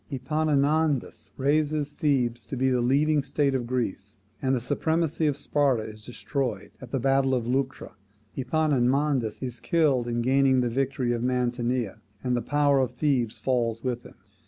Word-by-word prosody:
Epaminondas 145 -2 0
raises 150 +1 +1
Thebes 125 -5 0
to 135 - -5
be 130 +1 +2
the 125 -1 +2
leading 145 +4 +3
state 140 0 0
of 125 -3 -1
Greece, 105 -5 -3 0.2
and 130 0 +1
the - - 0
supremacy 160 +5 0
of 145 -2 0
Sparta 140 -6 +1
is 110 0 -10
destroyed 125 0 -4
at 130 - -9
the 135 - -1
battle 135 +1 +2
of 120 -2 -2
Leuctra. 130 +2 -2 0.4
Epaminondas 135 -3 +1
is 125 -2 -5
killed 145 -8 +2
in 120 0 -1
gaining 130 0 +3
the 120 - 0
victory 130 0 0
of 120 - -2
Mantinea, 125 -2 -1 0.2
and 125 -1 +1
the 120 - 0
power 145 0 +2
of 125 -2 -1
Thebes 125 -5 0
falls 115 -3 -1
with 125 -2 -2
him. - - -14
130 Hz, 160 wpm, -26 LUFS, 120-145 Hz, 0.4 s, leading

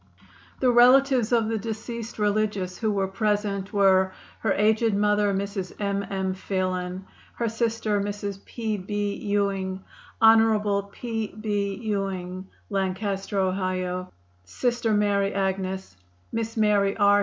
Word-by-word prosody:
The 255 - +4
relatives 250 0 +5
of 230 -2 +3
the 225 -1 -1
deceased 230 +2 -5
religious 205 -3 0
who 220 -2 +1
were 195 -1 0
present 205 -1 -1
were: 190 -2 +4 0.3
Her 220 - 0
aged 220 +1 +2
mother, 205 0 +2
Mrs. 195 -1 -3
M. 200 -1 -1
M. 190 -1 -1
Phelan; 185 -1 -3 0.3
her 235 - -1
sister, 225 -2 0
Mrs. 200 -1 -4
P. 220 -3 -3
B. 205 +1 -2
Ewing; 195 -2 -1 0.4
Hon. 215 -3 +4
P. 225 -1 -3
B. 205 -2 -1
Ewing, 190 -4 -3 0.2
Lancaster, 195 +1 -2
Ohio; 185 -1 -1 0.3
Sr. 235 - -1
Mary 200 -1 +2
Agnes, 190 - -2 0.4
Miss 225 0 -3
Mary 205 -2 +3
R. 205 -1 +5
205 Hz, 120 wpm, -25 LUFS, 190-220 Hz, 0.4 s, relatives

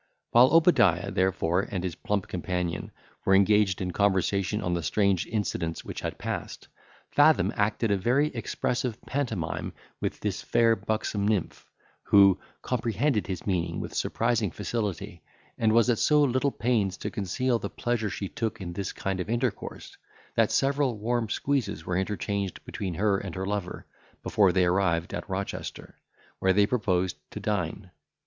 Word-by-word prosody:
While 120 +2 +7
Obadiah, 100 - +4
therefore, 95 -1 +1
and 95 -3 -3
his 90 -2 -2
plump 100 +2 -2
companion, 90 -1 -3 0.3
were 95 - +4
engaged 100 -1 +3
in 90 -1 -2
conversation, 100 +1 +1
on 90 - 0
the 85 - 0
strange 95 +3 +1
incidents 90 -7 -2
which - - -6
had - - -4
passed, - - -5 0.4
Fathom 150 +2 +4
acted 110 +1 +1
a 100 - +3
very 130 +10 +2
expressive 120 -1 -2
pantomime 110 - -3 0.3
with - - -3
this - - -2
fair 115 -1 +3
buxom 110 -2 -2
nymph, 105 -5 -2 0.4
who 100 -2 +6 0.2
comprehended 120 0 0
his 95 -3 -5
meaning 85 -4 -1
with - - -6
surprising 115 -3 0
facility, 105 -1 -4 0.3
and 110 -1 +2
was 115 +1 +4
at 120 -2 +2
so 150 -1 +4
little 130 +1 +2
pains 110 -7 0
to - - -5
conceal 120 +4 0
the - - -4
pleasure 120 -3 -1
she 100 - -4
took 110 +2 -3
in 85 -3 -6
this 95 +1 -3
kind 95 -1 -3
of 90 - -4
intercourse, 120 -2 -3 0.4
that - - +3
several 135 -3 +1
warm 115 +1 -1
squeezes 130 - -1
were 90 - -1
interchanged 100 0 -2
between 95 -4 -4
her 100 +1 +2
and 95 -4 -6
her 95 0 -3
lover, 100 -2 -4 0.4
before 100 -3 +3
they 90 0 +3
arrived 90 -2 +1
at - - -5
Rochester, 95 +1 -5 0.4
where 95 0 +3
they 100 +1 +5
proposed 95 -6 0
to - - -7
dine. 95 -2 -3
100 Hz, 155 wpm, -27 LUFS, 95-115 Hz, 0.4 s, While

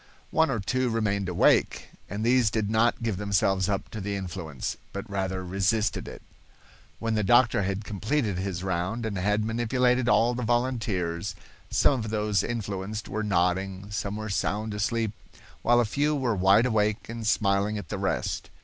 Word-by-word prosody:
One 160 -1 +3
or 120 -4 0
two 125 +6 0
remained 100 -4 0
awake, 90 - +2 0.2
and 105 +3 -3
these 125 -2 +4
did 105 0 -1
not 115 +1 +2
give 110 -5 -1
themselves 95 -1 +1
up 100 -1 -1
to 110 - -5
the 100 +1 -2
influence, 85 -7 -4 0.2
but 100 +3 -5
rather 95 -2 -2
resisted 100 +4 0
it. - - -9 0.7
When 115 -1 -2
the 105 -1 +1
doctor 120 +1 +4
had 100 +2 -2
completed 105 -1 -1
his 95 -2 -3
round 95 +5 -2
and 110 -2 -3
had 105 +3 +1
manipulated 125 +2 +1
all 120 0 +4
the 125 - -3
volunteers, 110 -8 -1 0.3
some 135 - +3
of 110 -1 -4
those 105 -2 +1
influenced 105 -2 -4
were 110 +2 -2
nodding, 95 0 0
some 105 -1 -3
were 110 0 -5
sound 105 +2 -1
asleep, 110 +1 0 0.5
while 120 0 +4
a 120 - +3
few 145 +7 +1
were 125 -6 0
wide 95 +5 +5
awake 110 -3 +1
and 115 -1 -5
smiling 100 0 +2
at 95 -6 -7
the - - -3
rest. - - -2
105 Hz, 170 wpm, -27 LUFS, 95-115 Hz, 0.7 s, wide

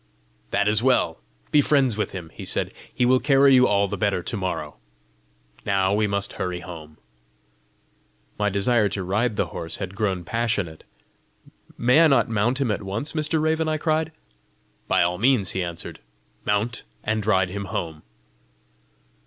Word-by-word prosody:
"That 100 0 +1
is 105 +1 +3
well! 125 -10 +2 0.3
be 150 - +6
friends 135 -5 +2
with 105 - -1
him," 85 -4 -8
he - - -9
said: - - -2 0.2
"he 125 - +1
will 130 +1 +4
carry 140 -1 +5
you 125 0 +6
all 100 0 +2
the 100 0 -5
better 100 -3 0
to 115 - -4
morrow! 95 -3 -3 0.9
Now 95 -1 +1
we 105 +1 +2
must 100 0 -2
hurry 90 -1 -3
home!" 80 -4 -10 1.4
My 105 0 +2
desire 105 +2 +2
to 95 0 -3
ride 105 +5 0
the - - -1
horse 80 - -4
had 95 -1 -5
grown 100 -4 -1
passionate. 105 -5 -2 0.9
"May 125 +6 +4
I 165 - +7
not 135 -7 +3
mount 115 +4 +1
him 130 -5 +1
at 105 - -2
once, 105 +9 -4
Mr. 155 0 0
Raven?" 160 +1 +1
I 155 0 0
cried. 155 0 0 0.8
"By - - +3
all 90 +1 -1
means!" 120 -5 +3
he 95 - -2
answered. 85 -1 -6 0.5
"Mount, 105 +3 0 0.2
and 110 0 -1
ride 95 -3 +2
him 100 +2 -5
home." 80 -4 -4
105 Hz, 165 wpm, -24 LUFS, 95-125 Hz, 1.4 s, I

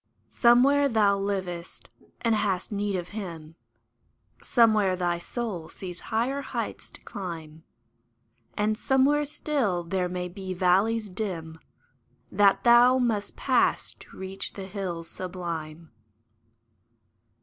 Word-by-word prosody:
Somewhere 275 +4 +5
thou 210 -4 +3
livest 185 -3 -4 0.3
and 230 -1 +2
hast 205 -3 0
need 205 -1 -1
of 180 -1 -4
Him: 170 -7 -7 0.9
Somewhere 215 -5 +3
thy 175 -1 -1
soul 190 -4 -5
sees 180 -2 -8
higher 250 +6 0
heights - - -5
to - - -15
climb; 165 -5 -7 0.9
And 215 +1 0
somewhere 280 +3 +3
still 270 - -1
there 180 +1 -1
may 180 0 -3
be 185 0 -6
valleys 200 +5 +2
dim 180 -5 -5 0.7
That 200 0 +4
thou 240 +2 +7
must 225 -5 -1
pass - - +1
to - - -15
reach 190 +1 -5
the 195 - -7
hills 180 -4 -5
sublime. 170 -3 -6
195 Hz, 115 wpm, -27 LUFS, 180-225 Hz, 0.9 s, thou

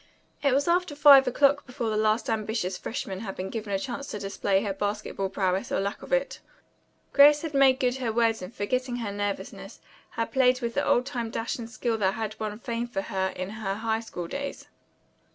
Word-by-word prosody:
It 280 -3 +3
was 280 +3 +1
after 345 -3 +1
five 275 -2 +8
o'clock 285 +3 +3
before 245 -3 -3
the - - -1
last 215 +1 +1
ambitious 215 -4 -1
freshman 210 -1 -5
had 195 -2 -6
been 190 +1 -5
given 215 -3 -5
a 195 - +2
chance 260 +6 -5
to - - -5
display 195 0 0
her 200 -2 -2
basketball 205 -1 -3
prowess 190 -1 -1
or - - +1
lack 200 +1 -3
of - - -11
it. - - 0 0.7
Grace 290 +2 +7
had 320 -2 -4
made 270 -1 +5
good 250 -1 +1
her 245 -4 -2
word 225 -1 +1
and 180 +2 -7
forgetting 250 +4 -2
her 230 -4 -3
nervousness 205 0 -5 0.3
had 230 -1 -3
played 255 -2 +3
with 235 -2 -3
the - - 0
old 245 - +2
time 240 -5 -3
dash 225 +2 -3
and 230 -1 -6
skill 230 -1 -2
that 190 -1 +1
had 220 -1 -4
won 210 -1 -3
fame 235 +1 -3
for 195 -5 -3
her 190 -3 -1
in 185 +2 -4
her 210 -3 -3
high 220 +1 -1
school 180 -6 -6
days. 280 +7 -5
225 Hz, 210 wpm, -27 LUFS, 205-255 Hz, 0.7 s, five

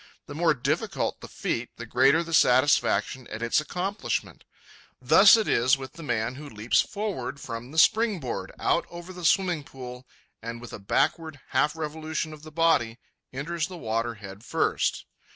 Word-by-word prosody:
The 145 - -9
more 160 0 +2
difficult 125 - -2
the - - -8
feat, 115 +1 -3
the 120 - -7
greater 135 +8 +4
the 165 0 -7
satisfaction 130 -1 +3
at 110 +1 -6
its 115 +5 +2
accomplishment. 180 +7 -3 0.5
Thus 160 - +7
it 220 - -1
is 130 +4 +3
with 135 +1 -9
the 165 - -11
man 120 -5 -1
who 145 +2 -9
leaps 110 +1 +2
forward 180 - -4
from 115 -1 -7
the 155 - -9
springboard, 200 - +2
out - - +1
over 175 +2 -9
the 180 -1 -9
swimming 175 -2 +2
pool, 125 -2 -10 0.3
and 115 +1 -6
with 120 -1 -10
a - - -6
backward 155 - 0
half 145 +4 +1
revolution 155 0 -4
of 150 - -12
the 155 0 -11
body, 155 -8 +2 0.3
enters 155 +4 -3
the 185 - -9
water 115 -3 -2
head 100 0 -11
first. - - 0
145 Hz, 170 wpm, -26 LUFS, 120-165 Hz, 0.5 s, Thus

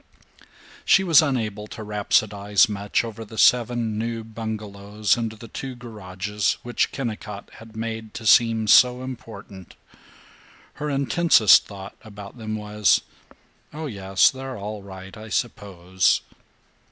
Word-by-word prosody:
She 195 - +4
was 165 -4 +6
unable 110 -8 -2
to 110 - -8
rhapsodize 105 -1 +2
much 105 0 -1
over 115 -1 -7
the 110 +1 -12
seven 120 -3 +2
new 115 0 -3
bungalows 105 -2 -3
and 115 -2 -3
the 110 +1 -12
two 130 +2 -7
garages 105 -3 -3
which 120 0 -1
Kennicott 105 -5 -6
had 110 0 -14
made 110 -1 -5
to 110 - -7
seem 115 0 +4
so 125 +3 +5
important. 105 -7 -10 1.1
Her 150 - -2
intensest 140 - +4
thought 100 -1 -10
about 105 +1 -11
them 110 -1 -4
was, 105 -1 +2 0.7
"Oh 155 +2 -6
yes, 95 -7 +2
they're 130 -1 -7
all 105 +1 -6
right 95 0 -11
I 110 0 -10
suppose." 95 -6 0
110 Hz, 130 wpm, -23 LUFS, 100-120 Hz, 1.1 s, was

